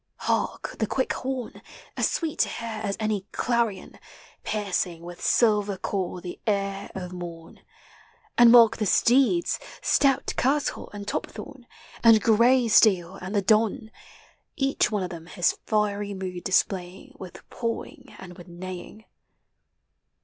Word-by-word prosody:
Hark! - - -2
the 220 - 0
quick 260 - -1
horn 255 -2 -5 0.2
— - - -23
As - - +1
sweet 325 -3 -3
to - - +3
hear 225 -2 -5
as 200 -2 -3
any 210 -3 -2
clarion 235 -5 -1 0.2
— - - -25
Piercing 185 -5 -2
with 175 0 -10
silver 210 -4 +2
call 185 -1 -3
the 175 0 -8
ear 200 -1 -1
of 180 -1 -6
morn; 170 -2 -9 0.8
And 240 -1 +7
mark 230 -2 +7
the 215 - -1
steeds, 270 - +3 0.2
stout 275 -1 +2
Curtal 280 +3 0
and 205 -1 -8
Topthorne, 265 +3 -6 0.4
And 225 -2 +7
Greysteil 220 -5 +4
and 185 +3 -5
the 200 - +2
Don 220 +3 +1 0.3
— - - -33 0.2
Each - - +1
one 210 -3 -1
of 180 - -5
them 165 -1 -9
his 175 -1 0
fiery 205 -1 0
mood 185 -2 -6
displaying 185 -1 -1
With 185 -2 -11
pawing 230 -1 -5
and 180 -2 -10
witli 175 0 -13
neighing. 185 +4 -9
205 Hz, 140 wpm, -25 LUFS, 185-230 Hz, 0.8 s, And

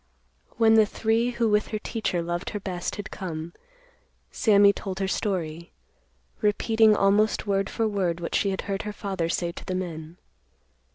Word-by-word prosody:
When 225 -1 +5
the 220 -1 +6
three, 225 +3 +1
who 235 -1 0
with 210 0 +2
her 215 - -3
teacher 210 -5 -2
loved 175 +2 -3
her 210 - -4
best, 180 -3 -4
had 205 +1 -7
come, 170 -3 -6 0.8
Sammy 200 -2 +5
told 190 -1 -6
her 195 0 -1
story; 170 -5 -3 0.7
repeating 220 +1 +3
almost 205 +3 +2
word 195 -1 0
for 225 -1 0
word 185 -5 -1
what 170 - -5
she 200 - +2
had 190 - -2
heard 195 -1 -3
her 210 - -5
father 190 -5 -3
say 170 0 -1
to - - -10
the 185 - -3
men. 165 -2 -5
195 Hz, 170 wpm, -26 LUFS, 175-215 Hz, 0.8 s, the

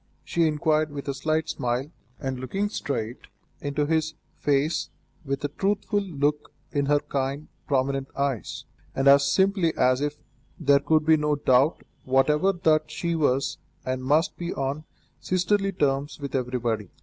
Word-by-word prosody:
she 170 -1 +1
inquired 155 0 +1
with 145 -1 -7
a 140 - 0
slight 155 +3 -1
smile, 125 +2 -2 0.3
and 130 -1 -3
looking 195 +11 -2
straight 125 - -4 0.3
into 145 +1 -1
his 160 +1 0 0.2
face 145 +2 0 0.3
with 140 -1 -3
a - - +2
trustful 205 +6 0
look 150 -5 -1 0.2
in 140 -1 0
her 145 0 +4
kind, 140 +2 -3 0.2
prominent 135 0 0
eyes, 140 -5 -2 0.3
and 135 +1 +1
as 140 0 +6
simply 190 -1 +3
as 130 +1 +3
if 145 0 -2 0.4
there 140 -3 +5
could 155 +2 +2
be 160 0 +6
no 150 0 +1
doubt 135 +2 +3 0.2
whatever 150 +8 +3
that 155 -4 +2
she 170 +2 -2
was 140 -4 +1 0.3
and 130 0 -2
must 155 +8 +2
be 175 0 -4
on 140 +3 -2 0.3
sisterly 195 +2 +1
terms 145 -4 -1
with 140 -1 -6
everybody. 120 -6 -1
145 Hz, 150 wpm, -26 LUFS, 135-160 Hz, 0.4 s, as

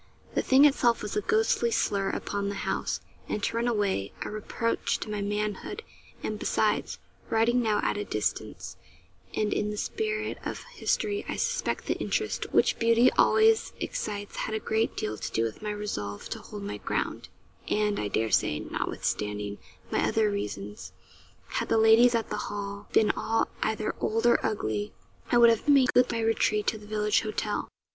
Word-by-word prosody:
The - - +2
thing 270 +2 +6
itself 245 -5 +3
was 210 - -4
a 210 - +1
ghostly 225 +3 +2
slur 200 -3 +1
upon 200 0 -2
the 200 - -4
house, - - -1 0.3
and, 210 - -2
to - - 0
run 235 +1 +1
away, 200 - 0
a - - -5
reproach 220 +2 -1
to 215 - -4
my 210 -1 -2
manhood; 210 - -3 0.4
and - - -3
besides, - - 0 0.3
writing 230 +2 +3
now 215 -3 +1
at - - 0
a 205 - -2
distance, 105 - -3 0.6
and 210 -1 +1
in 210 - 0
the 210 - -4
spirit 430 - -2
of - - -5
history, 415 -3 0
I - - -1
suspect - - -1
the - - -1
interest 425 - -2
which - - +3
beauty 230 +2 +5
always 445 0 +4
excites 205 -1 -4
had 220 - -2
a - - 0
great 220 +1 0
deal 105 0 -3
to - - -4
do 115 - +1
with 115 -1 -4
my 210 - -3
resolve 155 - -4
to - - -4
hold 205 -1 -8
my 200 - -4
ground; - - -3 0.4
and, 210 -1 +1
I 105 - -1
dare 110 +2 0
say, 75 - +2
notwithstanding 105 -1 -3 0.3
my - - +1
other 215 -2 +2
reasons, 105 - -5 0.5
had - - -3
the - - +3
ladies 225 +2 +6
at 225 -2 -1
the - - -1
Hall 200 0 -5
been 215 - +4
all 225 0 0
either 215 -1 0
old 225 +2 0
or 240 - +4
ugly, 110 - -2 0.4
I 240 - +5
would 235 -1 +8
have 230 +5 -1
made 275 -3 +5
good 250 0 +4
my 230 - -1
retreat 220 -1 +2
to 220 - -5
the 210 - -13
village 210 -1 +2
hotel. 215 -1 -2
215 Hz, 180 wpm, -28 LUFS, 200-230 Hz, 0.6 s, would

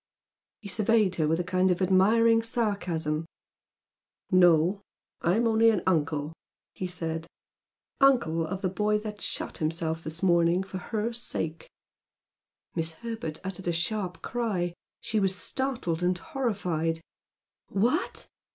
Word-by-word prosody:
He 210 - -8
surveyed 215 -1 +2
her 155 -2 +2
with 165 +2 +1
a - - 0
kind 185 +1 +2
of 180 - +1
admiring 220 +5 +4
sarcasm. 180 -9 -1 1.0
"No. 180 +1 +5 0.4
I'm 205 +8 +2
only 225 0 +5
an 210 -5 +1
uncle," 155 -3 0 0.4
he 185 - -4
said 165 -2 -4 0.7
"Uncle 235 - +4
of 190 +4 -5
the 185 - +2
boy 210 +3 +1
that 210 -1 -6
shot - - -3
himself 160 +1 -2
this 160 +3 -6
morning 170 0 +4
for 190 -1 -6
her 220 +4 -2
sake!" 165 -8 -4 1.0
Miss 165 -1 -2
Herbert 225 -6 -5
uttered 190 -1 -5
a - - +3
sharp 180 +2 -2
cry. 205 -8 -1 0.3
She 215 - 0
was 190 -2 +2
startled 230 -6 -2
and 180 0 +2
horrified. 180 - -2 0.7
"What!... 245 - 0
185 Hz, 130 wpm, -28 LUFS, 165-220 Hz, 1.0 s, No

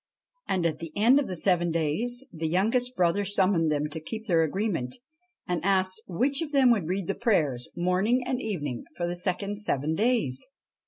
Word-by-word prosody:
And 180 -3 0
at 155 -2 0
the 165 -2 -7
end 235 +7 +5
of 285 - -2
the 185 - -4
seven 175 0 +2
days 170 - -1
the 160 -1 -3
youngest 230 +9 +1
brother 180 +3 +2
summoned 185 -5 +2
them 150 0 0
to 160 - -5
keep 220 +8 -7
their 170 -6 +3
agreement, 160 - -2 0.5
and 175 -3 -2
asked 190 +1 +2
which 265 - 0
of 315 -3 -4
them 270 -4 +5
would 205 -9 +1
read 190 +1 -2
the 195 - -1
prayers, 150 - 0
morning 190 +8 +1
and 255 0 -2
evening, 145 - -4
for 175 - -1
the 175 +1 -2
second 195 +3 -1
seven 155 -7 -1
days. 205 - 0
185 Hz, 190 wpm, -27 LUFS, 165-220 Hz, 0.5 s, end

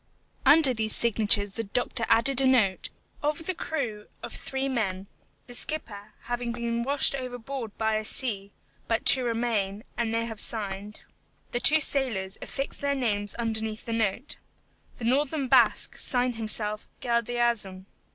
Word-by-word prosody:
Under 295 -4 +6
these 220 -2 -2
signatures 210 -3 +2
the 225 +3 -3
doctor 230 +2 0
added 265 +3 +4
a 265 - +3
note: 220 -8 +2 0.3
"Of 300 +2 -2
the 370 - 0
crew 245 -12 -4 0.2
of - - -6
three 270 0 -3
men, 195 -7 -2 0.4
the 245 - -10
skipper 215 -7 -1
having 240 0 -3
been 235 0 -2
washed 280 +3 +3
overboard 250 -3 -6
by 220 -1 +1
a 215 - -3
sea, 205 -4 0 0.4
but 225 - -1
two 260 - +7
remain, 225 -4 -1
and 230 -1 -1
they 230 0 0
have 225 -2 -7
signed." 205 -1 -3 0.5
The 240 - -1
two 310 +5 +6
sailors 230 -10 0
affixed 275 0 -4
their 280 0 0
names 205 -6 -1
underneath 220 -1 -3
the 230 - -3
note. 225 +4 -2 0.6
The 230 - -6
northern 275 +3 +1
Basque - - +4
signed 250 -1 +2
himself, 215 -1 0
GALDEAZUN. 235 -5 -1
235 Hz, 150 wpm, -27 LUFS, 215-260 Hz, 0.6 s, two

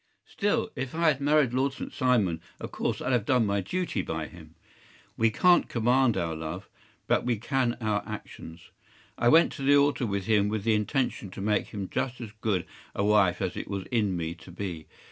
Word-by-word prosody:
“Still, 205 +1 -1
if 135 +2 -4
I 165 -1 +4
had 140 -2 0
married 145 -3 +3
Lord 135 +2 +1
St. - - -7
Simon, 115 - +1 0.2
of - - -7
course - - -2
I’d - - -1
have 120 -4 +2
done 125 0 +2
my 100 -1 0
duty 175 - -2
by 80 -3 -4
him. 80 -1 -14 0.6
We 115 0 +3
can’t 175 +10 +4
command 120 +1 +2
our 80 -1 -1
love, 80 +4 -6 0.4
but - - +2
we 120 -2 0
can 120 +1 0
our 110 -3 0
actions. 85 -5 -9 0.5
I 120 - +2
went 165 +4 +6
to 140 - -8
the 140 +1 +5
altar 140 -3 +2
with 100 -2 -2
him 105 -2 +3
with 105 -1 -2
the 115 0 +2
intention 105 -1 -1
to 95 - -10
make 105 +1 0
him 100 -2 -5
just 130 +5 -3
as 115 -4 -7
good 95 -6 0 0.3
a - - 0
wife 100 -3 +3
as 95 - -2
it - - -5
was 100 -2 -4
in 105 -6 +1
me 80 -1 -3
to 85 +1 -15
be. 90 -4 -6
110 Hz, 205 wpm, -28 LUFS, 95-130 Hz, 0.6 s, went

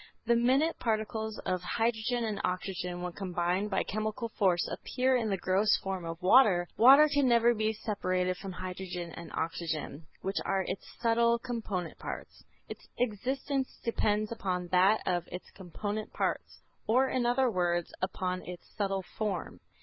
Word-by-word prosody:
The 235 +1 +4
minute 265 +7 +2
particles 220 -1 -2
of 185 -1 0
hydrogen 230 +4 0
and 215 -3 -2
oxygen 180 -1 -3
when 180 - -3
combined 180 +1 -1
by 190 - +1
chemical 215 +3 -3
force, 185 -5 +2
appear 260 +1 0
in 230 -3 0
the 195 - 0
gross 190 +4 +3
form 190 -2 -3
of 165 0 -5
water. 190 -4 +6
Water 275 +6 +8
can 285 -2 +2
never 235 0 +5
be 215 -1 0
separated 185 -4 -1
from 195 -1 -7
hydrogen 180 -1 -5
and 170 0 -9
oxygen, 160 -2 -3 0.2
which 195 +2 -2
are 195 -1 0
its 190 - -5
subtle 235 0 +3
component 225 -8 -4
parts. - - -7 0.2
Its - - -9
existence 260 +4 -1
depends 215 -2 +1
upon 180 -5 -2
that 190 +4 +4
of 175 -2 0
its 180 - -8
component 205 +4 -5
parts, - - -2 0.3
or 255 +4 +4
in 250 -2 0
other 245 0 +3
words, 175 -3 0
upon 185 -1 -2
its 180 -1 -9
subtle 195 -2 -1
form. 195 -2 -4
205 Hz, 155 wpm, -30 LUFS, 180-230 Hz, 0.3 s, Water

